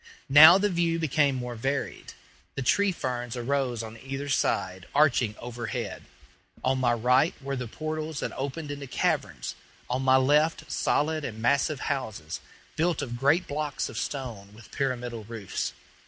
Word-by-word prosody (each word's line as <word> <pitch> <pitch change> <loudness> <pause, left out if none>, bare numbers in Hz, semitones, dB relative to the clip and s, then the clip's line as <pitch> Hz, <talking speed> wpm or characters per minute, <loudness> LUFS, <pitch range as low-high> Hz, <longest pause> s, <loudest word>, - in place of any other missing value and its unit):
Now 155 +6 +10
the 205 +1 +2
view 170 -3 +1
became 145 -3 +2
more 125 -1 -4
varied. 135 +5 -3 0.4
The 135 - -2
tree 200 +9 +3
ferns 125 -6 -4
arose 125 -2 -1
on 110 0 -9
either 135 +3 -5
side, 95 -8 0
arching 130 -7 +3
overhead; 120 -1 -5 0.6
on 130 0 +1
my 125 -2 +3
right 125 +6 +3
were 140 0 -4
the 125 -2 -4
portals 155 +3 -4
that - - -2
opened 145 +3 -4
into 140 -1 -6
caverns, - - -1 0.4
on 130 +1 0
my 130 0 +5
left 150 +5 +2
solid 155 +1 +1
and 110 -5 -5
massive 140 +4 +1
houses, 110 - -3 0.4
built 165 -1 +1
of 120 -3 -5
great 145 +7 +3
blocks 150 0 -3
of - - -8
stone, 110 -8 -5
with 110 0 -15
pyramidal 120 -4 -2
roofs. 110 -4 -4
135 Hz, 155 wpm, -27 LUFS, 120-150 Hz, 0.6 s, Now